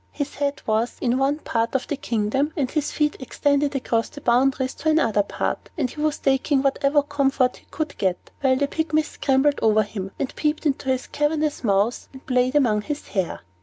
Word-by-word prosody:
His 285 -1 -4
head 285 -1 -2
was 220 +2 0
in 250 +1 +1
one 275 +2 +2
part 230 -5 -2
of 265 - +1
the 290 - -1
kingdom, 255 +3 0
and 265 -4 0
his 305 -2 -1
feet 300 -1 0
extended 285 +2 0
across 230 -3 0
the - - -10
boundaries 260 +1 +2
of 315 - -3
another 280 -10 +3
part; 200 - -3
and 265 -6 0
he 300 - -7
was 305 -1 +1
taking 270 +1 +1
whatever 280 +1 +2
comfort 275 -3 +1
he - - -22
could 310 -1 -4
get, 185 -2 -1
while 265 -1 +4
the 280 +2 +1
Pygmies 310 0 0
scrambled 275 +1 +2
over 215 -1 +4
him, 195 -2 -6
and 270 - -3
peeped 305 +1 -1
into 275 -2 0
his 260 -1 0
cavernous 300 0 -1
mouth, 205 +2 +1
and 265 - -13
played 255 +1 +1
among 230 -8 +3
his 295 +6 -5
hair. 190 -4 -2
270 Hz, 200 wpm, -23 LUFS, 240-290 Hz, -, while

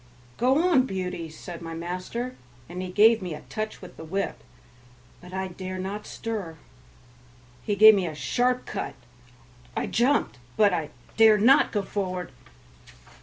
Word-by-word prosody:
"Go 270 +8 +3
on, 270 -7 +4
Beauty," 180 -4 -4
said 170 +2 -9
my 165 -1 -6
master, 185 +9 -4 0.3
and 180 +2 -6
he 185 - -5
gave 220 +4 +5
me 175 -4 -4
a - - -10
touch 215 -2 -5
with 180 - -12
the - - -8
whip, 190 +5 -3 0.8
but 180 0 -12
I 190 0 -3
dare 185 +1 -6
not 195 +3 -5
stir; 205 -8 -5 1.0
he 205 - -1
gave 215 +2 +9
me 190 -4 0
a 155 - -5
sharp 250 +10 0
cut; 195 - -5 0.8
I - - 0
jumped, 240 - +1 0.2
but 205 -3 +5
I 160 -4 -2 0.3
dare 220 -1 +7
not 255 +7 +5
go 205 -2 -1
forward. 185 -5 -4
195 Hz, 155 wpm, -26 LUFS, 180-225 Hz, 1.0 s, gave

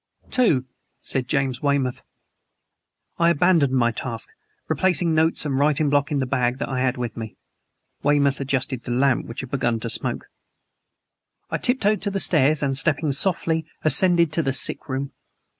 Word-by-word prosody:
"Two," 160 - +2 0.4
said 130 -2 -2
James 135 -3 -1
Weymouth. 140 -3 0 1.2
I 170 0 +4
abandoned 170 -4 +3
my 120 -2 +2
task, 115 -1 -6 0.4
replacing 180 -3 +2
notes 160 0 +1
and 135 -2 -1
writing 145 0 +2
block 145 0 +1
in 145 - 0
the 135 - 0
bag 125 -1 0
that - - -4
I 130 -1 -2
had 130 0 0
with 120 -2 -4
me. 110 -2 -8 0.6
Weymouth 140 -1 +2
adjusted 130 -2 -2
the 120 - -6
lamp 130 +1 +1
which 115 - -6
had 130 - -10
begun 120 -4 0
to 115 - -3
smoke. - - -3 1.3
I - - -1
tiptoed 215 -4 +1
to 200 - -2
the 195 0 -2
stairs 155 -4 +3
and, 135 -1 0
stepping 150 +1 +1
softly, 160 +1 0 0.2
ascended 170 0 +4
to 165 - +1
the 135 -3 -1
sick 135 - -1
room. 135 +1 -3
140 Hz, 165 wpm, -22 LUFS, 130-160 Hz, 1.3 s, I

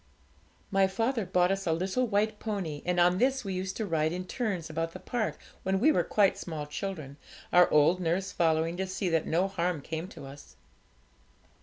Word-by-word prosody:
My 195 -1 +4
father 225 +2 -1
bought 180 0 +3
us 195 -1 -2
a 165 - +3
little 190 +9 0
white 210 0 0
pony, 185 -9 -3
and 180 0 +1
on 180 +1 +4
this 265 +1 +2
we 195 - -2
used 185 +1 -3
to 220 - -2
ride 160 -4 +1
in 180 +1 -4
turns 195 -7 -2
about 165 +1 -3
the - - -8
park 240 -4 -2 0.2
when 190 0 0
we 305 +9 +5
were - - +2
quite 200 -2 +2
small 155 -4 -5
children, 150 -3 -5 0.4
our 180 0 +7
old 155 +4 +4
nurse 185 +3 -1
following, 165 0 +1
to 190 0 -2
see 185 0 -2
that 165 -2 +1
no 175 +4 +2
harm 180 -3 -1
came 160 +4 -5
to 185 - -11
us. 140 +1 -12
180 Hz, 195 wpm, -29 LUFS, 165-195 Hz, 0.4 s, our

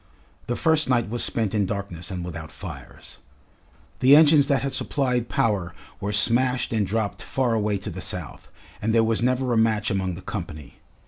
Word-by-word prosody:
The 120 - -1
first 160 -1 +2
night 120 -4 +2
was 120 - -1
spent 110 -4 -1
in 105 -3 +1
darkness 100 -4 -4
and 90 -3 -4
without 85 -3 -7
fires. - - -10 0.8
The 135 +3 +7
engines 150 -2 +6
that 140 -1 +1
had 140 - -2
supplied 125 -4 -1
power 95 -6 0 0.2
were 100 - -3
smashed 120 +4 +1
and 105 -3 +1
dropped 105 -2 -2
far 120 +6 0
away 105 -2 0
to - - -6
the - - -6
south, - - -6 0.3
and 110 +2 0
there 115 - +5
was 110 0 +1
never 125 0 +1
a - - +2
match 110 -1 +2
among 95 -2 -1
the 90 - -10
company. 80 -8 -7
110 Hz, 185 wpm, -24 LUFS, 95-125 Hz, 0.8 s, The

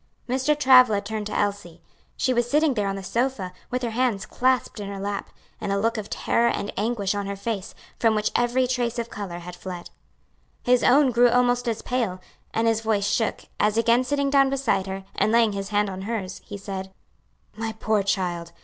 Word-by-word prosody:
Mr. 265 +4 +1
Travilla 255 -6 +6
turned 210 +1 -4
to 210 - -3
Elsie. 200 -5 -2 0.4
She 255 - +1
was 240 0 0
sitting 300 +1 +3
there 210 -4 -1
on 195 - -1
the 195 - -6
sofa, 230 -4 -1 0.2
with 250 0 -2
her 235 - -1
hands 225 -4 0
clasped 255 -2 0
in 205 - -5
her 200 -1 -6
lap, 200 +1 -4 0.3
and - - -2
a 200 - +1
look 230 +3 +1
of 215 -2 -5
terror 235 0 +1
and 200 - -3
anguish 210 -2 0
on 200 -1 -3
her 200 - -3
face, 200 -1 -4 0.2
from 225 -2 +3
which 210 0 0
every 240 +2 +2
trace 245 -2 -1
of 235 0 -4
color 195 -4 -5
had 175 +1 -8
fled. 180 -1 -8 0.7
His 250 0 +3
own 270 +1 +5
grew 240 +1 +5
almost 245 0 +2
as 230 -2 -2
pale, 230 -8 -1 0.3
and 225 +1 +1
his 225 -1 +2
voice 215 -3 +1
shook, 225 +1 0 0.2
as 210 +1 +2
again 230 +2 +4
sitting 280 +1 0
down 275 -1 +5
beside 260 -8 0
her, 190 0 -5
and 215 - +1
laying 230 -1 +4
his 195 0 -4
hand 210 0 +1
on 190 -1 -5
hers, 195 -3 -4
he 205 - -8
said, 190 -1 -6 0.6
"My 225 0 -3
poor 220 -1 +1
child! 180 -4 -2
220 Hz, 205 wpm, -24 LUFS, 200-245 Hz, 0.7 s, Travilla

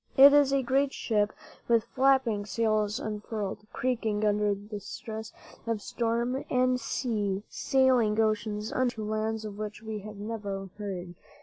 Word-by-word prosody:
It 280 +1 +10
is 290 -2 +5
a 275 -1 +2
great 270 +2 +2
ship, 210 -2 +1 0.4
with 230 -2 +4
flapping 260 -4 +2
sails 215 +1 +1
unfurled, 210 -2 -4
creaking 225 -4 0
under 210 -1 +2 0.2
stress 220 +2 -7 0.4
of 230 -2 0
storm 235 +4 -1
and 255 0 +2
sea, 210 -5 -1
sailing 250 -5 +3
oceans 215 -1 0
unknown 255 -1 +2
to 220 -3 -6
lands 215 +1 -2
of 205 -1 -7
which 215 +1 -5
we 220 -1 -4
have 210 +1 -9
never 200 -3 -5
heard. 185 -4 -5
220 Hz, 140 wpm, -29 LUFS, 210-245 Hz, 0.4 s, It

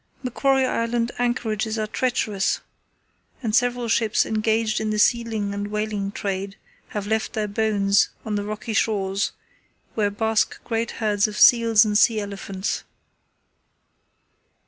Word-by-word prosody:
Macquarie 265 +1 +2
Island 230 -1 -1
anchorages 225 -3 -1
are 215 - -1
treacherous, 215 -3 0 0.8
and 220 -2 -1
several 245 -1 +1
ships 220 -1 +2
engaged 220 0 0
in 215 - -1
the 215 - -1
sealing 220 -2 +1
and 205 0 -3
whaling 210 -1 -2
trade 195 -1 -4 0.3
have 210 -2 -5
left 220 +1 -1
their 215 -2 -1
bones 205 -1 +2 0.2
on 220 - -3
the 205 -1 -1
rocky 215 +2 -5
shores, 200 -3 0 0.6
where 210 -2 +1
bask 220 +1 0
great 230 0 -2 0.2
herds 205 -1 +2
of 210 0 -7
seals 230 -3 +6
and 210 0 +2
sea 225 -2 +4
elephants. 200 -1 -4
215 Hz, 130 wpm, -23 LUFS, 205-230 Hz, 0.8 s, seals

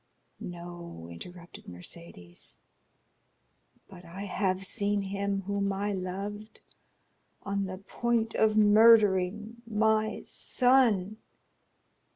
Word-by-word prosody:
"No," 170 - -9
interrupted 175 - -11
Mercédès, 90 - -11 1.3
"but 180 -2 -13
I 180 +3 -8
have 190 -1 -1
seen 200 +1 -1
him 195 0 -2
whom 200 +1 -1
I 200 +1 -2
loved 200 +3 -6 0.8
on 200 0 -2
the 185 0 -6
point 225 +3 -1
of 215 -1 +2
murdering 215 -1 +5
my 220 0 +1
son." 235 -6 +2
200 Hz, 90 wpm, -29 LUFS, 180-215 Hz, 1.3 s, murdering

